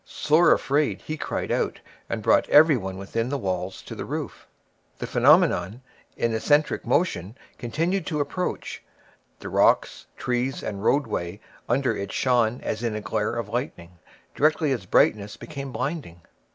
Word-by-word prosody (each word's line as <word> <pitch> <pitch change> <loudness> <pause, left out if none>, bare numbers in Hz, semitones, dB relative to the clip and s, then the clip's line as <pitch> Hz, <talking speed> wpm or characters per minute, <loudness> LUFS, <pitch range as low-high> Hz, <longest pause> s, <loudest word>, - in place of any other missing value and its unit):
Sore 155 +3 +3
afraid, 145 +1 +1
he 155 - -4
cried - - -3
out, - - -1 0.3
and - - -3
brought - - +3
everybody 130 - +4
within 115 +5 -3
the 140 - -1
walls 95 -4 -3
to - - -8
the - - -5
roof. - - -6 0.5
The - - -4
phenomenon, 100 +9 +3 0.3
in 115 -1 0
eccentric 145 +7 +1
motion, 130 - 0 0.2
continued 165 +9 -1
to 155 -4 -2
approach; 145 +6 -3 0.6
the - - -6
rocks, - - +2
trees, 125 +2 -2
and 100 -1 -5
roadway 100 -9 0 0.3
under 130 +2 +1
it 100 0 -5
shone 120 -2 +1
as 110 - -3
in 115 -3 -2
a 105 - -3
glare 110 +2 -2
of 115 -3 -3
lightning; 90 - -5 0.3
directly 155 0 +2
its 115 -8 -3
brightness 105 0 +2
became 140 -3 -7
blinding. 135 - -4
120 Hz, 150 wpm, -25 LUFS, 105-145 Hz, 0.6 s, everybody